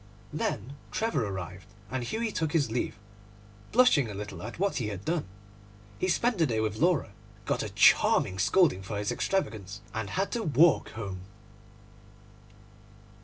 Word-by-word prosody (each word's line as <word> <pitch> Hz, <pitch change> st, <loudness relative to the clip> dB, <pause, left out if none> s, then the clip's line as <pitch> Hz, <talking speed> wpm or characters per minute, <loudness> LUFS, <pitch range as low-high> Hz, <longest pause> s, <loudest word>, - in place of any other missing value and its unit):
Then 135 Hz, +8 st, -3 dB
Trevor 220 Hz, -, 0 dB
arrived, 95 Hz, -1 st, -6 dB, 0.2 s
and 130 Hz, -1 st, -2 dB
Hughie 220 Hz, -, -2 dB
took 160 Hz, -6 st, -2 dB
his 145 Hz, -8 st, +2 dB
leave, 120 Hz, -2 st, -2 dB, 0.7 s
blushing 215 Hz, -, +5 dB
a 105 Hz, -, -6 dB
little 105 Hz, +1 st, -6 dB
at -, -, -7 dB
what 200 Hz, +3 st, 0 dB
he 120 Hz, -6 st, -1 dB
had 100 Hz, -2 st, -6 dB
done. 165 Hz, -1 st, 0 dB, 0.7 s
He 185 Hz, -, 0 dB
spent 225 Hz, +3 st, +1 dB
the 160 Hz, -, +4 dB
day 115 Hz, -3 st, 0 dB
with 110 Hz, -1 st, -1 dB
Laura, 160 Hz, -, +2 dB, 0.3 s
got -, -, 0 dB
a -, -, -3 dB
charming 95 Hz, 0 st, +4 dB
scolding 115 Hz, -, +3 dB
for 100 Hz, +2 st, -5 dB
his 105 Hz, 0 st, -1 dB
extravagance, 105 Hz, -, -2 dB
and 110 Hz, -2 st, -3 dB
had 195 Hz, -, -1 dB
to 235 Hz, -, -1 dB
walk 160 Hz, -, +4 dB
home. 100 Hz, -4 st, -5 dB
120 Hz, 155 wpm, -29 LUFS, -, 0.7 s, blushing